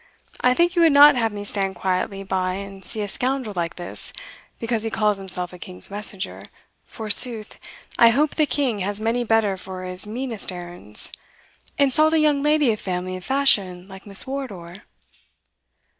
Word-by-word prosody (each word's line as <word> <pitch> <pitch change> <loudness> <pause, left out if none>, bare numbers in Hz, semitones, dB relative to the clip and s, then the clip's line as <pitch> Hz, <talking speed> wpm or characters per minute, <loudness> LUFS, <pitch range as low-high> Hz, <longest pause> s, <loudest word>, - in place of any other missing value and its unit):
I 250 0 +3
think 345 +4 +2
you 345 - +3
would 330 -2 +6
not 290 0 +8
have 225 -2 0
me 205 0 -6
stand 195 -2 -1
quietly 190 +2 -2
by 185 -1 -1
and 195 0 -8
see 215 - -3
a 205 - -2
scoundrel 250 +1 -2
like 170 -1 -2
this, 175 -1 -3 0.5
because 230 -1 -2
he 225 - -3
calls 210 -2 0
himself 180 -2 0
a 180 - -11
king's 180 +2 -4
messenger, 205 -1 -3 0.4
forsooth 220 0 +3 0.4
(I 235 - +8
hope 285 +6 +2
the 305 -2 +1
king 255 -5 0
has 200 +2 -2
many 230 +3 0
better 220 -4 +1
for 185 0 -8
his 185 +2 -4
meanest 230 -2 -4
errands) 175 - -5 0.7
insult 305 +3 +3
a - - +4
young 300 -2 +2
lady 300 -3 +3
of 215 - -3
family 185 0 -3
and 185 0 -7
fashion 195 -9 +1
like 190 +1 -12
Miss 200 -1 -2
Wardour?" 200 -11 -6
210 Hz, 175 wpm, -22 LUFS, 185-255 Hz, 0.7 s, not